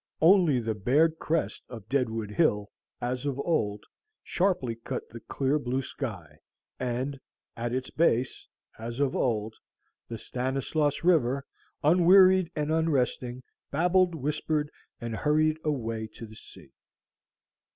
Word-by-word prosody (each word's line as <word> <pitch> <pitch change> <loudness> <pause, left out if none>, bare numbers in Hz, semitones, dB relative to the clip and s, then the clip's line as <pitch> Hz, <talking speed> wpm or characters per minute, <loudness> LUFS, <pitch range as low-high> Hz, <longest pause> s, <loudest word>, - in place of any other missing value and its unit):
Only 165 -5 +5
the 115 -1 -2
bared 145 +10 +2
crest 160 0 -1
of 115 -5 -9
Deadwood 115 -5 -1
Hill, 105 0 +1 0.3
as 125 +3 -2
of 135 -2 -2
old, 105 -11 0 0.4
sharply 175 -10 0
cut 115 - -6
the 115 - -9
clear 140 +5 -1
blue 130 0 -2
sky, 90 - -7 0.4
and 130 +2 -2 0.4
at 120 0 -3
its 130 +1 -3
base, 130 -6 +1 0.3
as 115 +3 -6
of 140 -2 +1
old, 110 -3 0 0.5
the 115 - -6
Stanislaus 135 +6 -1
River, 140 -6 +2 0.4
unwearied 185 +2 +6
and 150 0 -1
unresting, 130 -5 0 0.3
babbled, 180 +3 +2
whispered, 150 +1 -1 0.3
and 115 -2 -4
hurried 155 +4 +2
away 115 -7 -2
to 115 - -8
the 110 0 -13
sea. - - -14
130 Hz, 125 wpm, -28 LUFS, 115-155 Hz, 0.5 s, unwearied